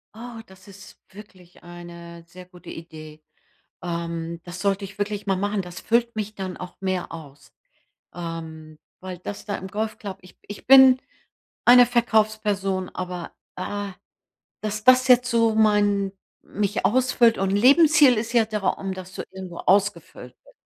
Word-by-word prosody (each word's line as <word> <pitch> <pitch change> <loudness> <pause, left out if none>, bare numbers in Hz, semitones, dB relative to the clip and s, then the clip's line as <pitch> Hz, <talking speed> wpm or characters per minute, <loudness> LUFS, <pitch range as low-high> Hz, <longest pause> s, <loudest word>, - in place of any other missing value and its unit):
Oh, 235 0 -9
das 190 +1 -18
ist 200 +1 -14
wirklich 185 -4 -16
eine 170 -1 -11
sehr 180 +1 -13
gute 180 -1 -15
Idee. 155 -2 -11 0.6
Ähm, 170 -1 -4
das 175 0 -8
sollte 200 0 0
ich 195 +1 -13
wirklich 205 0 -3
mal 195 - +2
machen. 205 +1 -1
Das 180 0 -9
füllt 235 0 +1
mich 215 0 -4
dann 190 -2 -6
auch 180 0 -9
mehr 185 -2 -3
aus, 145 -4 -12 0.6
ähm, 160 -2 -8 0.2
weil 185 -1 -7
das 200 +2 -8
da 205 - -3
im 190 - -7
Golfclub 210 -1 -5
ich 180 - -18
ich 205 +3 -10
bin 265 -1 +8 0.7
eine 245 0 +8
Verkaufsperson, 215 -5 0
aber, 180 -2 -6 0.2
ah, 200 +1 -5 0.7
dass 215 0 -4
das 255 0 +5
jetzt 250 0 +5
so 230 -1 +2
mein 205 -2 +2 0.3
mich 205 0 -3
ausfüllt 245 -1 +3
und 195 0 0
Lebensziel 285 +3 +5
ist 230 +2 -4
ja 230 -2 +4
der 210 -1 -3
Raum, 195 0 -2
dass 185 0 -10
du - - -5
irgendwo 185 -2 -8
ausgefüllt 200 +1 -1
bi - - -20
195 Hz, 155 wpm, -23 LUFS, 180-220 Hz, 0.7 s, bin